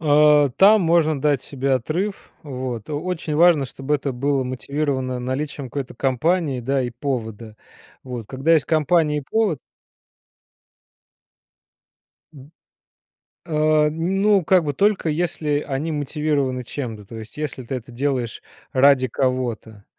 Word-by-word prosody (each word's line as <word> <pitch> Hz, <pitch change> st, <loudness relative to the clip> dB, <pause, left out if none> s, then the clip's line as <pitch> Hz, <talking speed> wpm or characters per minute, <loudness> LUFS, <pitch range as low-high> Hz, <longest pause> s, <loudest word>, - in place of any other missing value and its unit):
Э. 150 Hz, -1 st, +5 dB
Там 205 Hz, +2 st, +7 dB
можно 160 Hz, -4 st, +2 dB
дать 145 Hz, -3 st, +1 dB
себе 135 Hz, -1 st, -2 dB
отрыв. 170 Hz, -, -2 dB
Вот. 125 Hz, -5 st, -5 dB
Очень 160 Hz, 0 st, -3 dB
важно, 165 Hz, -4 st, +5 dB
чтобы 135 Hz, +3 st, -3 dB
это 140 Hz, -1 st, -2 dB
было 135 Hz, +1 st, 0 dB
мотивировано 130 Hz, 0 st, -2 dB
наличием 130 Hz, +2 st, -4 dB
какой-то 135 Hz, 0 st, -5 dB
компании, 135 Hz, +2 st, 0 dB
да, 135 Hz, +2 st, 0 dB
и 120 Hz, -, -3 dB
повода. 115 Hz, -4 st, -5 dB, 0.5 s
Вот, 125 Hz, -4 st, -7 dB
когда 135 Hz, +7 st, 0 dB
есть 155 Hz, -, +2 dB
компания 155 Hz, -1 st, +2 dB
и 145 Hz, -, -5 dB
повод 210 Hz, -10 st, +1 dB, 2.7 s
М. 140 Hz, +2 st, -14 dB, 0.9 s
Э, 155 Hz, -1 st, +2 dB
ну, 190 Hz, +5 st, +1 dB
как 180 Hz, +1 st, +4 dB
бы, 145 Hz, -1 st, -2 dB
только 200 Hz, 0 st, +1 dB
если 150 Hz, -2 st, -1 dB
они 145 Hz, +4 st, -2 dB
мотивированы 145 Hz, -3 st, -1 dB
чем-то. 115 Hz, -6 st, -6 dB
То 115 Hz, -, -11 dB
есть, 110 Hz, +5 st, -10 dB
если 150 Hz, -4 st, -4 dB
ты 130 Hz, -, -4 dB
это 120 Hz, -1 st, -8 dB
делаешь 125 Hz, -2 st, -2 dB, 0.3 s
ради 130 Hz, -1 st, +5 dB
кого-то. 120 Hz, -6 st, -2 dB
140 Hz, 130 wpm, -22 LUFS, 130-155 Hz, 2.7 s, Там